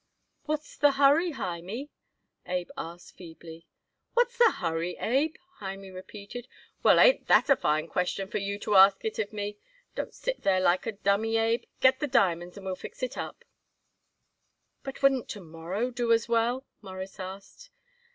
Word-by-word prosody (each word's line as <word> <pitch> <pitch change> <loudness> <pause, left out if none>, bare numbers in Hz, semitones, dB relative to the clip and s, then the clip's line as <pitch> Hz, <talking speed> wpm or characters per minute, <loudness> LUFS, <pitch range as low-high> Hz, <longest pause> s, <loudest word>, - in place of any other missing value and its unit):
"What's 305 -1 -4
the 290 -1 +4
hurry, 290 +5 +4
Hymie?" 195 - -5 0.6
Abe 180 -1 -2
asked 170 +2 -8
feebly. 165 -1 -12 0.5
"What's 485 0 +2
the 480 -1 +6
hurry, 165 +2 -2
Abe!" 275 +8 +1 0.2
Hymie 195 -1 -7
repeated. 200 +6 -9 0.3
"Well, - - +6
ain't - - +5
that - - +5
a - - +8
fine 155 -4 0
question 180 +3 -1
for 210 - -3
you 200 0 -3
to 210 - -1
ask 195 +1 +7
it 220 - -3
of 210 -2 -2
me! 205 -1 -5 0.3
Don't - - -5
sit - - -3
there 190 -1 +3
like 185 +2 +2
a 225 - -2
dummy, 205 +3 +1
Abe. 225 +1 +1 0.2
Get 260 0 +5
the 295 - -1
diamonds 180 -8 +1
and 195 - -10
we'll 190 -1 -2
fix 255 - -10
it 255 - -2
up." - - -7 1.4
"But 270 0 -8
wouldn't 270 -3 +3
to 210 - -5
morrow 175 +8 -4
do 240 -1 -1
as 230 0 +3
well?" 235 +3 +1 0.2
Morris 190 -1 -8
asked. 195 - -9
205 Hz, 165 wpm, -28 LUFS, 185-260 Hz, 1.4 s, a